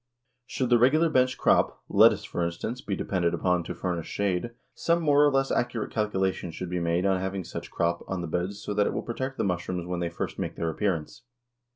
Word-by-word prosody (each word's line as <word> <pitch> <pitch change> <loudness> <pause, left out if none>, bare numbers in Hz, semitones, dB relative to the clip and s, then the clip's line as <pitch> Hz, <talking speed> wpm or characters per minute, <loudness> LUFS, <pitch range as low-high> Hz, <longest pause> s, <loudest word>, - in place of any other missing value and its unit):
Should 125 -2 -2
the 120 - +6
regular 155 +7 +4
bench 130 -2 +2
crop, - - +2
lettuce, - - +5
for 85 - -3
instance, 85 +9 -3
be 100 - -3
depended 85 -3 0
upon 90 0 +1
to 90 - -5
furnish 85 -2 -3
shade, 100 +2 -1 0.2
some 170 0 +1
more 145 -1 +5
or 145 - +5
less 135 0 +1
accurate 120 -2 -1
calculation 95 -4 -1
should 85 +2 -6
be 90 - -1
made 85 +2 0
on 95 -1 +2
having 95 0 -3
such - - -7
crop 85 0 -1
on 95 -2 -3
the 85 - -4
beds 90 +5 -2
so 105 - -3
that 105 0 +2
it - - -1
will - - -3
protect 130 +3 -4
the - - 0
mushrooms 90 -1 -2
when 90 0 -3
they 85 -1 -1
first 85 - -5
make - - -3
their 80 -1 -1
appearance. 90 +1 -2
95 Hz, 220 wpm, -27 LUFS, 85-120 Hz, 0.2 s, the